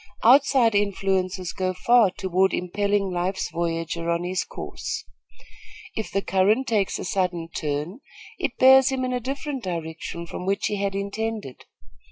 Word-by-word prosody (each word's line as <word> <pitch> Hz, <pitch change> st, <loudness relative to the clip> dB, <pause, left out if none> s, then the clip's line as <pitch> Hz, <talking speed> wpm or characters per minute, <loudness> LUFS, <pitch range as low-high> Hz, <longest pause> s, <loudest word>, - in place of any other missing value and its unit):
Outside 255 Hz, -1 st, +5 dB
influences 190 Hz, -3 st, 0 dB
go 185 Hz, -1 st, -2 dB
far 235 Hz, +2 st, +4 dB
toward 190 Hz, +1 st, +1 dB
impelling 200 Hz, +2 st, 0 dB
life's 180 Hz, +1 st, -2 dB
voyager 165 Hz, 0 st, -2 dB
on 170 Hz, +1 st, 0 dB
his 180 Hz, +1 st, -1 dB
course. -, -, -6 dB, 0.9 s
If 220 Hz, -, -3 dB
the 195 Hz, +1 st, -1 dB
current 205 Hz, +7 st, +2 dB
takes 215 Hz, -6 st, 0 dB
a -, -, -6 dB
sudden 180 Hz, -3 st, -1 dB
turn, 150 Hz, -, -3 dB, 0.4 s
it -, -, -2 dB
bears 265 Hz, +1 st, +7 dB
him 260 Hz, -1 st, -1 dB
in 255 Hz, -, -2 dB
a 250 Hz, -, 0 dB
different 275 Hz, +2 st, -4 dB
direction 170 Hz, -1 st, -5 dB
from 180 Hz, +2 st, -7 dB
which 200 Hz, +1 st, 0 dB
he 210 Hz, -, -1 dB
had 200 Hz, 0 st, -1 dB
intended. 200 Hz, -, -4 dB
195 Hz, 150 wpm, -24 LUFS, 175-225 Hz, 0.9 s, bears